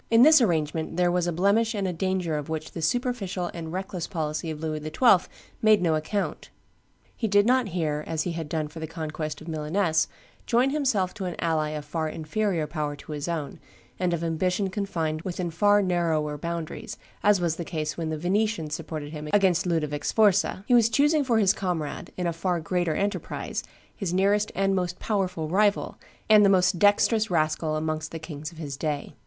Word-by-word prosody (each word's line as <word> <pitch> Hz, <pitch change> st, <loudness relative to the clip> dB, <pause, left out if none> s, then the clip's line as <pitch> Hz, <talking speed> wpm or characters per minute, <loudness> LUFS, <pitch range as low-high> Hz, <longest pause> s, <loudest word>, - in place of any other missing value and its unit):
In 230 Hz, +1 st, +6 dB
this 310 Hz, -1 st, +8 dB
arrangement 160 Hz, -4 st, 0 dB
there 175 Hz, -1 st, +3 dB
was 175 Hz, -1 st, +1 dB
a -, -, +1 dB
blemish 200 Hz, +7 st, +2 dB
and 200 Hz, -2 st, -1 dB
a 180 Hz, -, -2 dB
danger 180 Hz, -2 st, -1 dB
of 150 Hz, 0 st, -4 dB
which 155 Hz, -1 st, -4 dB
the 165 Hz, -, -6 dB
superficial 200 Hz, -, -1 dB
and 165 Hz, -2 st, -6 dB
reckless 185 Hz, -1 st, -4 dB
policy 155 Hz, -2 st, -3 dB
of 155 Hz, -1 st, -5 dB
Louis 155 Hz, -1 st, -3 dB
XII. 185 Hz, +4 st, +4 dB, 0.3 s
made 215 Hz, -1 st, +5 dB
no 170 Hz, -3 st, +2 dB
account: 155 Hz, +7 st, -2 dB, 0.7 s
he 225 Hz, -, -1 dB
did 205 Hz, 0 st, +4 dB
not 250 Hz, -1 st, +3 dB
here, 155 Hz, -5 st, -2 dB
as 160 Hz, -1 st, -1 dB
he 175 Hz, -, -2 dB
had 165 Hz, -2 st, -5 dB
done 155 Hz, -1 st, -1 dB
for 155 Hz, +2 st, -10 dB
the 160 Hz, -, -4 dB
conquest 155 Hz, -2 st, -5 dB
of 155 Hz, -, -11 dB
Milaness, 160 Hz, +1 st, +1 dB, 0.4 s
join 245 Hz, +3 st, +3 dB
himself 250 Hz, -11 st, +1 dB
to 195 Hz, -, -5 dB
an 175 Hz, -2 st, -3 dB
ally 160 Hz, -2 st, 0 dB
of 150 Hz, -1 st, -5 dB
far 160 Hz, +1 st, -2 dB
inferior 165 Hz, +2 st, -1 dB
power 150 Hz, -1 st, -3 dB
to 145 Hz, +2 st, -11 dB
his 150 Hz, 0 st, -4 dB
own, 160 Hz, -5 st, -4 dB, 0.4 s
and 180 Hz, -1 st, +1 dB
of 170 Hz, -1 st, -1 dB
ambition 180 Hz, +4 st, 0 dB
confined 165 Hz, -6 st, -2 dB
within 175 Hz, -1 st, -3 dB
far 205 Hz, +4 st, +4 dB
narrower 165 Hz, -5 st, 0 dB
boundaries, 170 Hz, +1 st, -5 dB, 0.2 s
as 205 Hz, -2 st, +4 dB
was 170 Hz, -2 st, 0 dB
the 170 Hz, -, -3 dB
case 155 Hz, -2 st, -3 dB
when 165 Hz, -2 st, -3 dB
the 155 Hz, -, -2 dB
Venetians 185 Hz, -2 st, 0 dB
supported 155 Hz, -2 st, -5 dB
him 150 Hz, -1 st, -6 dB
against 185 Hz, -3 st, +3 dB
Ludovie 150 Hz, -4 st, 0 dB
Sforza: 200 Hz, -2 st, +2 dB
he -, -, +3 dB
was 230 Hz, -2 st, +6 dB
choosing 295 Hz, +5 st, +3 dB
for 240 Hz, -4 st, +2 dB
his 200 Hz, -2 st, +4 dB
comrade, 175 Hz, -7 st, -3 dB
in 180 Hz, -, -2 dB
a 170 Hz, -, 0 dB
far 175 Hz, +1 st, -1 dB
greater 175 Hz, -1 st, -1 dB
enterprise, 205 Hz, +1 st, -3 dB, 0.3 s
his 185 Hz, -4 st, -2 dB
nearest 205 Hz, +2 st, +2 dB
and 195 Hz, +1 st, +2 dB
most 180 Hz, -2 st, -1 dB
powerful 185 Hz, -6 st, -1 dB
rival, 200 Hz, +5 st, +1 dB, 0.3 s
and 215 Hz, -1 st, +7 dB
the 200 Hz, -, +6 dB
most 185 Hz, -2 st, +3 dB
dexterous 215 Hz, +2 st, +4 dB
rascal 155 Hz, -2 st, 0 dB
amongst 155 Hz, 0 st, -2 dB
the 165 Hz, -, -6 dB
kings 155 Hz, -1 st, -7 dB
of 165 Hz, -, -16 dB
his 145 Hz, -4 st, -5 dB
day. 145 Hz, 0 st, -3 dB
175 Hz, 195 wpm, -26 LUFS, 155-200 Hz, 0.7 s, this